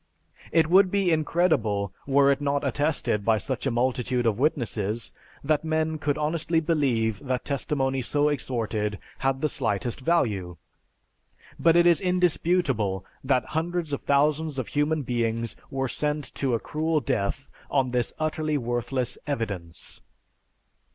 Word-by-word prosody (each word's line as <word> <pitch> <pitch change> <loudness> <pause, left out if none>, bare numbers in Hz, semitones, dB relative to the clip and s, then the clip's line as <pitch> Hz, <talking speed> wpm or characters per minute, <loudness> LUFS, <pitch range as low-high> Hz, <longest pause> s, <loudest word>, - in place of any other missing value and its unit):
It 160 -1 +4
would 185 +3 +6
be 195 -2 +2
incredible 145 - +1
were 140 0 +5
it 140 +1 0
not 140 0 0
attested 140 -6 0
by 110 +1 +3
such 130 +6 -3
a - - +3
multitude 125 0 0
of 115 -1 +1
witnesses, 115 -7 -1 0.3
that 150 +1 +1
men 160 0 0
could 145 -1 0
honestly 160 +2 0
believe 130 -10 +1
that 130 -2 -2
testimony 135 -1 -1
so 145 +5 +1
extorted 115 -7 -1 0.2
had 135 0 0
the 155 - +2
slightest 115 -4 -1
value. 105 - 0 1.0
But 165 0 +4
it 175 0 +6
is 170 -2 +5
indisputable 170 - +1 0.2
that 130 -1 +2
hundreds 165 -1 -1
of 140 - -2
thousands 150 +1 +1
of 130 - -3
human 145 +1 0
beings 115 -2 -1
were 135 -1 -1
sent 150 +2 -2
to 130 -4 0
a - - -1
cruel 155 +4 0
death 120 +2 -2 0.2
on 135 -3 +1
this 125 -1 0
utterly 155 -1 -1
worthless 120 0 -2
"evidence." 100 - -4
140 Hz, 140 wpm, -26 LUFS, 120-155 Hz, 1.0 s, would